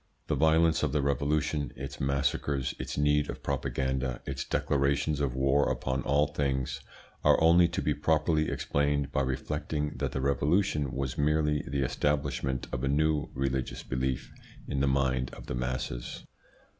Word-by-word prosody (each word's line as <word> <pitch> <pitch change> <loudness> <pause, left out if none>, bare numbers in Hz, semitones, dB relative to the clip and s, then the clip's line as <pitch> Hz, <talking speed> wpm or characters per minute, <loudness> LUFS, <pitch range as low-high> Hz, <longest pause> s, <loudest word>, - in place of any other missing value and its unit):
The - - -1
violence 80 +2 +4
of 75 -2 0
the 75 - +2
Revolution, 70 +1 0
its 70 +2 -7
massacres, 70 0 0
its - - -5
need 75 0 +2
of - - -6
propaganda, 65 -1 -1
its 70 0 -3
declarations 70 +1 0
of 70 -4 -1
war 70 +2 +3
upon 65 0 -2
all 70 +2 +3
things, 70 -3 -2 0.4
are - - +5
only 85 +2 +6
to 85 - -3
be 75 - +2
properly 75 +1 +1
explained 70 -1 0
by 70 - +1
reflecting 75 +3 -2
that - - -2
the - - -3
Revolution 70 +2 +1
was 65 0 -3
merely 75 0 +2
the 70 0 0
establishment 70 -2 -1
of 65 -1 -3
a - - +1
new 75 +1 +1
religious 65 -1 -2
belief 65 0 -2 0.4
in 70 - -1
the 70 - +2
mind 65 -2 +1
of - - -11
the - - -4
masses. 60 -1 -3
70 Hz, 155 wpm, -29 LUFS, 65-75 Hz, 0.4 s, only